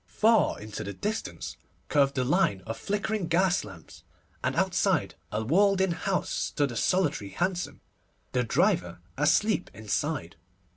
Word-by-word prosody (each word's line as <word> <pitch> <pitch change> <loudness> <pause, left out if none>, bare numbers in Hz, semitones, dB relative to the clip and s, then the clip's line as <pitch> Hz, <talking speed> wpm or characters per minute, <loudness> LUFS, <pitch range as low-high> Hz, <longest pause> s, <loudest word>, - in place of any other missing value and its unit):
Far 215 - +3
into 105 0 -6
the 100 - -5
distance 215 - -4 0.3
curved 140 -2 +3
the 130 - +1
line 125 - +2
of 115 - -4
flickering 205 - -2
gas 175 +2 +2
lamps, 95 -6 -12 0.4
and - - 0
outside - - +1 0.2
a 105 - -1
little 120 +9 0
walled 200 0 +5
in 190 -1 +2
house 185 +2 -1
stood 145 -3 0
a - - -6
solitary 150 - +1
hansom, 175 - -2 0.5
the 125 -1 +1
driver 90 -6 +1 0.2
asleep 180 +8 +2
inside. 110 - -2
150 Hz, 145 wpm, -28 LUFS, -, 0.5 s, walled